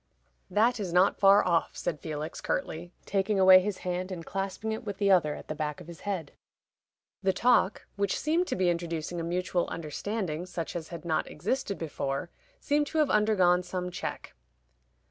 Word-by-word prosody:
"That 230 Hz, +3 st, +2 dB
is 190 Hz, -4 st, -3 dB
not 180 Hz, +3 st, +3 dB
far 200 Hz, 0 st, +6 dB
off," 170 Hz, -2 st, +1 dB
said 165 Hz, -4 st, -2 dB
Felix, 155 Hz, +1 st, -5 dB
curtly, 175 Hz, +2 st, -3 dB
taking 195 Hz, +1 st, 0 dB
away 185 Hz, 0 st, +9 dB
his 195 Hz, 0 st, -2 dB
hand, 180 Hz, +1 st, -2 dB
and 170 Hz, -3 st, -6 dB
clasping 195 Hz, +3 st, -3 dB
it 220 Hz, -, -4 dB
with 205 Hz, -3 st, -5 dB
the 200 Hz, -1 st, +3 dB
other 160 Hz, -6 st, +4 dB
at -, -, -10 dB
the -, -, -3 dB
back 150 Hz, -1 st, -3 dB
of -, -, -11 dB
his 170 Hz, 0 st, -10 dB
head. 185 Hz, -8 st, -4 dB, 0.9 s
The 190 Hz, -1 st, +3 dB
talk, 235 Hz, -2 st, +2 dB
which 200 Hz, -1 st, 0 dB
seemed 330 Hz, +4 st, +1 dB
to -, -, -1 dB
be 185 Hz, -2 st, +2 dB
introducing 170 Hz, 0 st, -3 dB
a -, -, -3 dB
mutual 175 Hz, +1 st, -1 dB
understanding, 170 Hz, +1 st, -4 dB
such 170 Hz, -2 st, -5 dB
as 165 Hz, -2 st, -4 dB
had 170 Hz, 0 st, -8 dB
not 160 Hz, -2 st, 0 dB
existed 200 Hz, -, -2 dB
before, 150 Hz, 0 st, -3 dB, 0.3 s
seemed 295 Hz, 0 st, +1 dB
to 320 Hz, -, -4 dB
have 305 Hz, -2 st, +3 dB
undergone 190 Hz, -4 st, +4 dB
some 180 Hz, 0 st, -4 dB
check. 180 Hz, -, -5 dB
180 Hz, 185 wpm, -29 LUFS, 170-200 Hz, 0.9 s, away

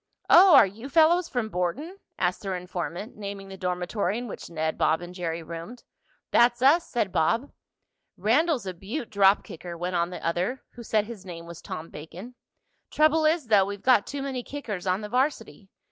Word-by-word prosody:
"Oh, 360 Hz, -2 st, +9 dB
are 265 Hz, -, +9 dB
you 220 Hz, +8 st, -8 dB
fellows 335 Hz, +3 st, +4 dB
from 245 Hz, -4 st, -2 dB
Borton?" 245 Hz, -, -3 dB, 0.2 s
asked 180 Hz, 0 st, 0 dB
their 195 Hz, -2 st, -3 dB
informant, 180 Hz, +3 st, -6 dB
naming 200 Hz, -1 st, -7 dB
the 195 Hz, -, -8 dB
dormitory 180 Hz, +2 st, -2 dB
in 245 Hz, +1 st, -5 dB
which -, -, -8 dB
Ned, 160 Hz, -1 st, -2 dB
Bob 160 Hz, -, +2 dB
and 175 Hz, 0 st, -9 dB
Jerry 170 Hz, -2 st, -4 dB
roomed. 170 Hz, +9 st, -8 dB, 0.5 s
"That's 240 Hz, +1 st, +4 dB
us," 315 Hz, +6 st, +5 dB
said 220 Hz, -6 st, -1 dB
Bob. 230 Hz, -, +1 dB, 0.7 s
"Randell's 250 Hz, -, +2 dB
a 185 Hz, -, -4 dB
beaut 215 Hz, -, -6 dB
drop 200 Hz, -1 st, +4 dB
kicker," 170 Hz, +1 st, -9 dB
went 180 Hz, +2 st, -3 dB
on 170 Hz, 0 st, +1 dB
the 180 Hz, -, -8 dB
other, 180 Hz, +10 st, -1 dB
who 240 Hz, -, -11 dB
said 215 Hz, -2 st, 0 dB
his 220 Hz, -4 st, -9 dB
name 170 Hz, -3 st, -9 dB
was 170 Hz, -1 st, -10 dB
Tom 160 Hz, +1 st, -7 dB
Bacon. 175 Hz, +10 st, -10 dB, 0.6 s
"Trouble 310 Hz, +1 st, +3 dB
is 315 Hz, -1 st, +2 dB
though, 200 Hz, -3 st, +5 dB
we've 200 Hz, 0 st, -7 dB
got 250 Hz, -5 st, +4 dB
too 280 Hz, -1 st, -4 dB
many 265 Hz, -2 st, -3 dB
kickers 220 Hz, -9 st, -6 dB
on 185 Hz, +3 st, +1 dB
the 210 Hz, -, -6 dB
varsity. 250 Hz, -5 st, -2 dB
200 Hz, 190 wpm, -26 LUFS, 180-255 Hz, 0.7 s, Oh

